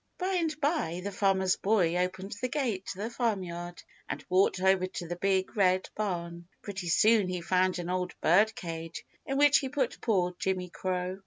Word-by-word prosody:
By 375 0 0
and 315 -2 -2
by 285 - 0
the 200 - -3
Farmer's 190 -2 +2
Boy 190 -5 +2
opened 185 +2 -2
the 255 - 0
gate 240 -9 -2
to - - -5
the 215 +4 -4
Farmyard 180 -8 -3 0.3
and - - -5
walked 185 0 +3
over 190 0 +3
to 175 -2 -6
the 175 - -3
Big 190 +3 0
Red 185 -2 +2
Barn. 170 -4 -4 0.2
Pretty 195 -3 -5
soon 215 +4 +4
he 180 -1 -2
found 185 +1 +1
an 175 0 -4
old 180 -1 -2
birdcage, 165 -3 0 0.2
in 270 - -1
which 290 0 +6
he 270 - -4
put 265 -3 -2
poor 180 -6 +1
Jimmy 185 0 -1
Crow. 185 +1 -3
190 Hz, 180 wpm, -29 LUFS, 180-215 Hz, 0.3 s, which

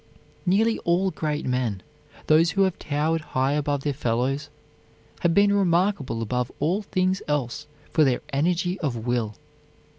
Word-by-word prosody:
Nearly 220 +5 +3
all 180 +3 +1
great 155 -2 -3
men, 125 -7 -1 0.4
those 160 +2 +5
who 195 +3 +2
have 190 -2 0
towered 155 +3 0
high 130 -2 0
above 145 -1 -1
their 145 - 0
fellows, 135 +3 -1 0.7
have 170 -1 +1
been 200 0 +5
remarkable 175 - +1
above 125 +2 -2
all 175 +8 +1
things 185 -1 0
else 145 -5 -2 0.3
for 155 - +5
their 130 -4 +2
energy 175 +5 0
of 140 -7 -1
will. 120 -4 -1
150 Hz, 145 wpm, -25 LUFS, 130-180 Hz, 0.7 s, those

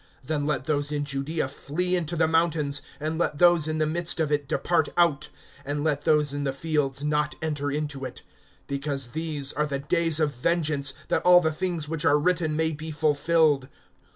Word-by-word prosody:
(21)Then 145 0 -1
let 140 -4 -1
those 145 0 -1
in 145 -1 -1
Judaea 140 +2 -2
flee 180 +6 -2
into 170 -1 -1
the 160 -1 +2
mountains; 160 -3 +1 0.2
and 155 +2 -3
let 150 -3 0
those 175 -2 +4
in 155 0 -2
the 155 - +1
midst 170 +2 -1
of 155 -2 0
it 145 -1 0
depart 160 +1 +1
out; 155 -4 +2 0.3
and 145 +1 -3
let 145 -2 -1
those 150 -2 +3
in 145 0 -3
the 135 - 0
fields 140 -2 -1
not 150 0 0
enter 150 -2 -2
into 145 -1 -3
it. 130 - -7 0.4
(22)Because 140 -2 -3
these 155 -3 -1
are 150 +1 0
the 140 -1 -2
days 165 +2 +1
of 150 -2 +1
vengeance, 145 0 +1 0.2
that - - +1
all 180 0 +7
the 160 -2 0
things 170 -2 -2
which 160 +1 -2
are 145 -2 +4
written 160 0 0
may 160 +1 +1
be 155 +1 -6
fulfilled. 150 -2 +2
150 Hz, 195 wpm, -26 LUFS, 145-160 Hz, 0.4 s, all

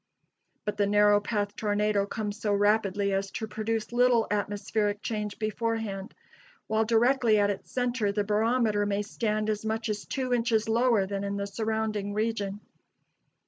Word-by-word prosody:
But 210 0 -2
the 205 -1 +2
narrow 205 0 +5
path 205 -1 -2
tornado 205 -1 +1
comes 210 0 -4
so 205 -1 +1
rapidly 205 -1 +2
as 195 0 -1
to 220 - -4
produce 220 +1 -3
little 245 -2 +4
atmospheric 205 0 -1
change 210 -2 -3
beforehand; 215 -2 -3 0.5
while 220 0 +1
directly 235 0 +3
at 205 0 +3
its 200 - -7
center 245 -4 0
the 205 0 0
barometer 215 0 +1
may 205 0 0
stand 215 0 -1
as 215 -1 -1
much 220 +1 -2
as 210 -1 -3
two 255 -2 -2
inches 230 -2 +1
lower 230 -2 +3
than 200 0 -3
in 200 0 -2
the 200 - -2
surrounding 215 -1 -2
region. 210 -2 -2
210 Hz, 155 wpm, -28 LUFS, 205-225 Hz, 0.5 s, narrow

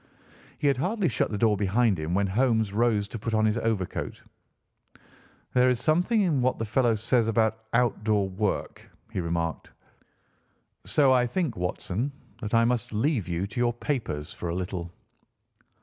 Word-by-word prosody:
He - - -4
had 140 -2 +3
hardly 190 - 0
shut 130 - 0
the 105 - -3
door 110 0 +3
behind 105 +1 +2
him 80 +3 -2
when 100 +1 +2
Holmes 110 0 +1
rose 110 -2 +2
to 115 - -6
put 110 +1 -2
on 110 0 +3
his 105 -1 +1
overcoat. 110 -5 -2 1.3
"There 125 0 +5
is 125 -2 +1
something 180 - +2
in 160 -9 +2
what 130 +1 +1
the 115 - -2
fellow 120 +1 +2
says 115 +2 +1
about 110 -1 +1
outdoor 110 -4 +2
work," 100 +2 -2 0.3
he - - -3
remarked, 85 -1 -2 1.2
"so 140 -3 +4
I 125 -1 +3
think, 155 -2 -1
Watson, 90 +7 -2 0.3
that 110 0 -1
I 115 0 +5
must 120 -1 -1
leave 115 - 0
you 85 +2 -1
to 115 +4 -6
your 120 0 +2
papers 110 - -3
for 85 - -5
a 85 - -2
little." 90 -1 -4
115 Hz, 165 wpm, -27 LUFS, 100-125 Hz, 1.3 s, There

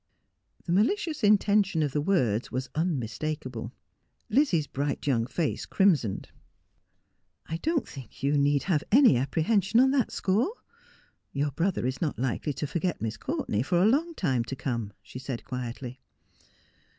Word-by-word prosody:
The 170 - -3
malicious 275 - +1
intention 205 -4 +3
of 145 - -1
the 150 - 0
words 125 - +1
was 130 +1 -3
unmistakable. 135 -5 -3 0.6
Lizzie's 210 - +3
bright 140 0 -3
young 120 -5 +1
face 160 +3 -2
crimsoned. 155 - +2 0.6
' - - -48
I - - 0
doht 315 - -1
think 135 -2 -11
you 140 +1 +2
need 145 0 +2
have 160 -6 +1
any 255 - +7
apprehension 190 - +2
on 265 +1 +5
that 270 -3 +2
score. 220 - +1 0.8
Your 145 +1 0
brother 170 -1 -1
is 130 +1 -2
not 155 -4 -1
likely 130 +3 -1
to 150 - -3
forget 170 +3 -2
Miss 110 0 -3
Courtenay 105 0 -2
for 175 +7 +1
a 185 - +4
long 310 +9 +2
time 130 - 0
to 135 - -5
come,' 115 -6 -3
she 130 - -9
said 130 -2 -5
quietly. 125 0 -6
150 Hz, 150 wpm, -28 LUFS, 130-195 Hz, 0.8 s, any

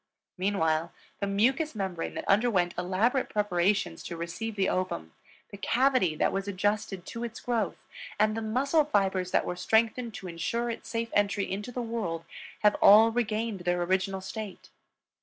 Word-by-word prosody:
Meanwhile 170 -4 0 0.3
the 200 - -1
mucous 255 +9 +1
membrane 190 -5 -3
that - - -5
underwent 195 -4 +3
elaborate 195 +9 +1
preparations 195 - +1
to 170 - -5
receive 180 +7 -4
the 195 -2 +1
ovum, 185 - -2 0.4
the 200 - -8
cavity 250 - +2
that - - +1
was 195 0 -2
adjusted 200 -1 -1
to 230 - -6
its 235 -1 -5
growth, 230 -5 -1 0.4
and 215 0 +3
the 225 - -2
muscle 275 +8 +2
fibers 190 -8 +1
that - - +2
were 180 - -3
strengthened 225 +4 +1
to 190 - -7
insure 205 +8 -2
its 230 - -8
safe 230 0 -2
entry 200 -1 +1
into 205 +5 -4
the 245 0 -3
world 205 -8 -3 0.4
have 210 0 +6
all 220 +3 +8
regained 225 -2 -1
their 175 0 0
original 190 +2 0
state. 210 +1 -7
205 Hz, 160 wpm, -28 LUFS, 185-230 Hz, 0.4 s, all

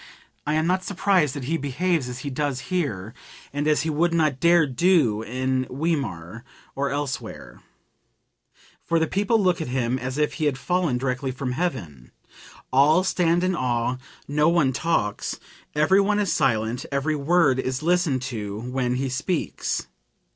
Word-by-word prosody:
I 150 - +1
am 155 +1 +1
not 185 +2 +1
surprised 185 -7 +1
that 140 - -5
he 160 +6 -1
behaves 145 0 -1
as 125 0 -6
he 140 - -3
does 140 -1 -1
here 115 - -2 0.4
(and 145 +1 -1
as 150 0 +3
he 160 - -1
would 170 +3 +1
not 155 -5 +1
dare 170 +1 +5
do 135 - +2
in 130 +2 -1
Weimar 125 - -3 0.3
or 140 +1 -1
elsewhere), 140 -2 -5 1.2
for 165 - +1
the 160 - +2
people 205 +6 +1
look 180 -4 +2
at 160 - -3
him 125 0 -1
as 130 +2 -4
if 150 0 +1
he 155 - -2
had 140 -3 +1
fallen 175 -3 0
direct 130 +1 -2
from 130 -1 -3
heaven. 125 - -4 0.6
All 150 +7 +5
stand 175 -2 +2
in 185 0 +1
awe, 125 -2 0 0.3
no 150 +3 +3
one 160 -6 +2
talks, 130 -8 -1 0.4
everyone 195 +7 +3
is 205 -4 +1
silent, 120 -3 +1
every 140 +3 0
word 145 -2 +3
is 130 +1 -2
listened 165 -7 +1
to 105 -6 -4
when 125 0 -1
he 135 +2 -1
speaks. 130 - -2
145 Hz, 160 wpm, -24 LUFS, 125-170 Hz, 1.2 s, dare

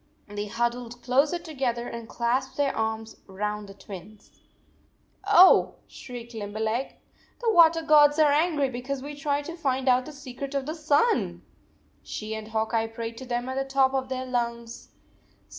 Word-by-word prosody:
They 205 0 -5
huddled 240 +2 -3
closer 275 +7 +2
together 265 -8 -3
and 235 -1 -7
clasped 240 +2 -1
their 285 -1 +1
arms 220 0 -3
around 210 +2 -3
the 195 - -12
Twins. 200 +1 -12 1.0
"Oh," 380 -2 +7
shrieked 240 -1 -10
Limberleg, 220 +3 -3 0.4
"the 460 -2 +1
water 330 -2 +6
gods 295 -1 +6
are 305 -2 +5
angry 300 -1 +2
because 260 +2 -5
we 290 +1 -6
tried 290 -1 -2
to 335 - -6
find 265 -5 -1
out 250 0 +3
the - - -7
secret 275 0 -7
of 275 -1 -1
the 310 - -3
sun! 310 +7 +1 0.3
" - - -37
She 215 0 -6
and 220 -1 -6
Hawk 220 +1 -2
Eye 225 0 +1
prayed 230 0 -6
to 260 - -8
them 245 0 -2
at 260 - -3
the 270 - +1
top 270 0 +2
of 260 -1 -1
their 260 0 -3
lungs. 235 -1 -3
255 Hz, 170 wpm, -26 LUFS, 225-285 Hz, 1.0 s, Oh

